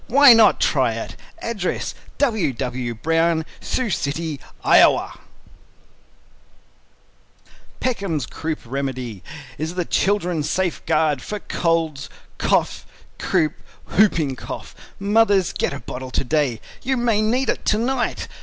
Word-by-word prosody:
Why 275 +1 +8
not 225 -2 +5
try - - +2
it? - - -6 0.3
Address: 210 -6 -2 0.2
W. 220 - +1
W. 125 -1 -3
BROWN, 165 +5 +1
Sioux 255 -5 -2
City, 150 -1 -2 0.2
Iowa - - +4 2.6
PECKHAM'S 195 - -1
CROUP 160 +5 -4
REMEDY 130 -5 -4 0.4
Is 160 +3 -3
the 180 -2 -1
Children's 180 -7 0
safe 185 -2 -1
guard 155 -4 +2
for 210 - -5
Cough, - - -7
Colds, 165 -4 0 1.1
Croup, 160 -4 +1 0.4
Whooping 160 -10 +2
Cough. - - -7 0.2
Mothers, 200 -2 +3
get - - -1
a 140 - -6
bottle 130 0 -7
to 130 - -1
day, 135 -4 0 0.2
you 265 +1 0
may 230 -3 +2
need 245 +5 +1
it - - -1
to 210 - +3
night. 245 +2 -1
165 Hz, 120 wpm, -21 LUFS, 140-215 Hz, 2.6 s, Why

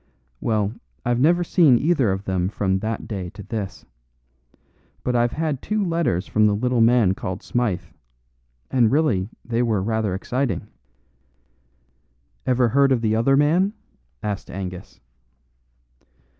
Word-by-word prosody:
"Well, 105 -2 0 0.3
I've 120 0 +1
never 175 +6 +4
seen 160 -7 +5
either 140 - +2
of 95 +1 -3
them 95 -2 -1
from 95 -2 0
that 110 +2 -4
day 95 -5 -4
to 105 - -8
this. 100 -4 -5 1.2
But 125 - 0
I've 120 0 +2
had 155 -4 -2
two 210 -1 -1
letters 165 - 0
from 105 0 +3
the 105 - +2
little 125 +2 +1
man 115 -4 +4
called 95 +2 -5
Smythe, 110 -7 -1 0.9
and 120 -4 +3
really 125 -11 +1 0.2
they 120 0 0
were 110 -5 +1
rather 110 -3 -1
exciting." 125 +3 -2 1.8
"Ever 125 -1 +3
heard 140 +3 +3
of 125 -3 +2
the 110 -1 +1
other 135 +5 +3
man?" 175 +8 +3 0.5
asked 105 -2 -4
Angus. 90 -1 -7
115 Hz, 135 wpm, -23 LUFS, 100-135 Hz, 1.8 s, seen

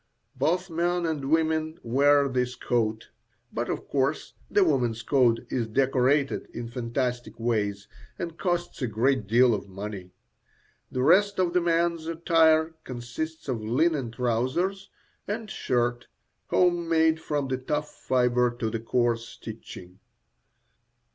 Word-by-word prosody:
Both 170 +8 0
men 175 +1 0
and 150 -4 -2
women 160 0 +1
wear 140 +4 +4
this 125 -1 -1
coat; 110 -3 -1 0.4
but, - - -2
of - - -4
course, 140 +2 -1 0.2
the 205 - +4
woman's 125 -8 +1
coat 125 -5 +3
is 120 -3 -1
decorated 135 +3 +1
in 120 -1 -5
fantastic 120 0 -3
ways 105 -3 -1 0.3
and 170 -1 -5
costs 175 -2 -2
a 125 - 0
great 115 +1 +1
deal 120 +3 +5
of 100 -1 -4
money. 95 -1 -7 0.8
The 130 - -1
rest 200 +6 +4
of 180 -2 +1
the 180 - +3
man's 170 -1 +1
attire 165 -1 +3
consists 130 +7 -6
of 125 -5 -2
linen 135 +3 +1
trousers 130 +12 -1 0.4
and 215 +1 -4
shirt, 120 -1 -1 0.4
home 175 -2 +2
made 160 -1 +3
from 145 -3 -2
the 130 -1 -1
tough 150 +3 -3
fibre 125 -1 +2
to 110 -2 -2
the 115 - -2
coarse 115 0 0
stitching. 100 -6 -10
130 Hz, 135 wpm, -26 LUFS, 120-160 Hz, 0.8 s, deal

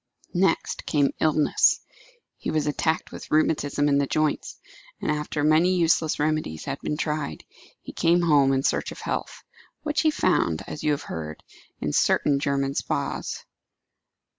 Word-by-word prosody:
Next 190 +2 +1
came 145 -3 +2
illness. 155 -1 +3 0.6
He - - -4
was 155 -2 0
attacked 160 +2 -1
with - - -9
rheumatism 145 -2 +1
in 140 -1 +3
the 140 - +1
joints; 155 +1 -1 0.4
and - - -1
after 150 0 -2
many 160 +5 +4
useless 165 -2 +2
remedies 150 - -1
had 140 0 -4
been 150 - -3
tried, 150 - -3 0.4
he - - -9
came 175 +1 +3
home 145 -5 +4
in 135 0 +1
search - - 0
of - - -9
health, - - -4 0.4
which 300 0 0
he 315 - +4
found, 175 - +1
as - - -7
you 150 - +2
have 145 -1 0
heard, 80 -1 -6 0.4
in 75 - -2
certain 140 -1 +3
German 140 -1 0
spas. - - -3
150 Hz, 155 wpm, -25 LUFS, 140-160 Hz, 0.6 s, many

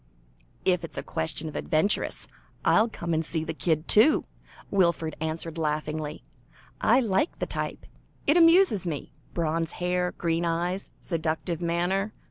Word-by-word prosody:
"If 180 -2 +2
it's - - -8
a - - -3
question 80 - -3
of 155 - -7
adventuresses, 170 +5 0 0.4
I'll 225 +2 +5
come 170 -5 -3
and 160 0 +1
see 160 0 -2
the 160 - -4
kid 160 0 0
too," 225 +9 +5 0.5
Wilfred 170 -5 +2
answered 160 +1 -2
laughingly. 155 0 -2 0.6
"I 240 +4 +5
like 225 - +1
the - - -2
type; - - -4 0.4
it 295 - +4
amuses 330 - +5
me. 150 -4 -4 0.2
Bronze 165 -1 -1
hair, 180 0 -1
green 165 0 -1
eyes, 175 +3 -1
seductive 165 0 -2
manner. 180 +5 0
170 Hz, 140 wpm, -27 LUFS, 160-190 Hz, 0.6 s, I'll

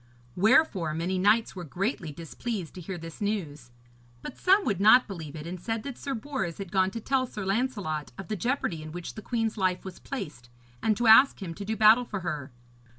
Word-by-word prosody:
Wherefore 195 - +3
many 180 +3 -1
knights 210 +4 +3
were 180 - -6
greatly 175 - -3
displeased 170 +4 -5
to 180 - -9
hear 180 +2 -5
this 165 +2 -10
news, 165 - -3 0.5
but - - -7
some 385 +2 +4
would 200 -3 0
not 235 +5 +7
believe 165 -7 -7
it, 150 0 -7
and 175 +1 -6
said 225 +2 -3
that 280 -3 -6
Sir 275 +1 -4
Bors 225 - -4
had 195 -3 -7
gone 190 -1 +3
to 230 - -6
tell 260 +2 0
Sir 210 -4 -6
Lancelot 195 - -1
of 195 - -8
the 215 - -2
jeopardy 200 - -1
in 155 0 -8
which 175 0 -6
the 215 - -8
queen's 225 0 -2
life 185 -2 0
was 190 -2 -8
placed, 150 - -7 0.3
and 215 -2 +2
to 240 - 0
ask 225 +5 +7
him 180 -5 -5
to 200 - -7
do 220 +2 -2
battle 220 +4 +6
for 205 -4 -5
her. 150 -5 -4
195 Hz, 215 wpm, -28 LUFS, 170-225 Hz, 0.5 s, not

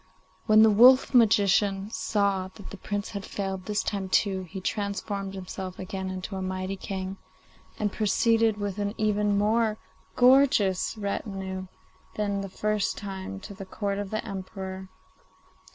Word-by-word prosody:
When 215 0 +7
the 220 - +6
wolf 255 +6 +6
magician 205 -3 +3
saw 200 -4 0
that 200 - -11
the 200 - -8
Prince 205 +1 -4
had 200 -2 -5
failed 190 -2 -4
this 210 -1 0
time 195 -2 -3
too, 190 0 +2
he 190 - -6
transformed 200 0 -3
himself 185 0 -6
again 190 0 -5
into 185 +2 -5
a 190 - -3
mighty 185 +1 -3
king, 190 0 -5 0.6
and 210 -2 -1
proceeded 225 +1 +2
with 205 -1 -3
an 205 +1 -2
even 210 -1 +1
more 215 +1 +2 0.4
gorgeous 245 -7 +4
retinue 195 -2 -4 0.5
than 200 -1 -1
the 195 - -5
first 210 +1 -1
time 195 -1 -6
to 200 - -9
the 195 0 -8
Court 200 0 -3
of 205 -1 -4
the 215 - -3
Emperor. 190 -1 -6
200 Hz, 150 wpm, -27 LUFS, 190-210 Hz, 0.6 s, When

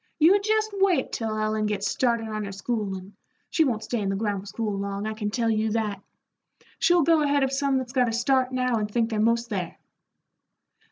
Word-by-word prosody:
You 360 +6 +5
jest 435 +1 +1
wait 375 -8 +2
till 220 -2 -2
Ellen 215 0 0
gets 205 -1 -1
started 235 -3 0
on 215 -1 -3
her 200 - -6
schoolin' 195 -2 -4 0.4
she 325 - +3
won't 230 -7 -1
stay 240 - -2
in 200 -2 -1
the 195 - 0
grammar 205 -1 -2
school 210 0 -3
long, 200 +1 -3
I 220 - -2
can 215 -1 -3
tell 230 +1 0
you 220 0 +1
that. 210 -4 -2 0.8
She'll 350 -1 +4
go 325 +1 +4
ahead 285 -1 +2
of 270 0 0
some 275 0 +1
that's 255 -1 -4
got 250 -3 +3
a - - -2
start 255 +2 +1
now 250 -2 +1
and 210 -1 -2
think 230 +1 0
they're 215 - -1
'most 230 +2 +1
there." 185 -4 -3
225 Hz, 210 wpm, -25 LUFS, 210-260 Hz, 0.8 s, You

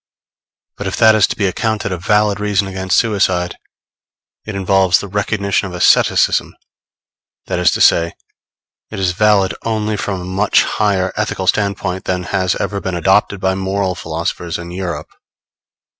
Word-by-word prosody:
But - - -4
if - - -2
that 110 0 +6
is 110 -2 +4
to - - -4
be 100 - -1
accounted 105 +1 -1
a 90 - -2
valid 105 +2 +1
reason 105 -1 0
against 95 -1 -1
suicide, 95 -6 0 0.9
it 110 - -5
involves 95 -1 +3
the 100 - -6
recognition 100 0 -1
of 90 - -8
asceticism; 90 - +3 0.9
that - - -2
is - - +4
to - - -1
say, 85 0 +4 0.8
it - - -6
is 95 -2 +1
valid 100 0 +2
only 110 -1 -2
from 100 -2 -3
a 90 - -7
much 95 +3 +2
higher 95 -3 0
ethical 105 -3 -2
standpoint 100 -2 -1
than 90 -1 -1
has 95 -1 -1
ever 100 -1 -3
been 95 -1 -3
adopted 95 +3 +2
by 95 0 0
moral 95 0 -1
philosophers 85 +1 -4
in 85 0 -8
Europe. 85 -4 -5
95 Hz, 160 wpm, -17 LUFS, 90-105 Hz, 0.9 s, that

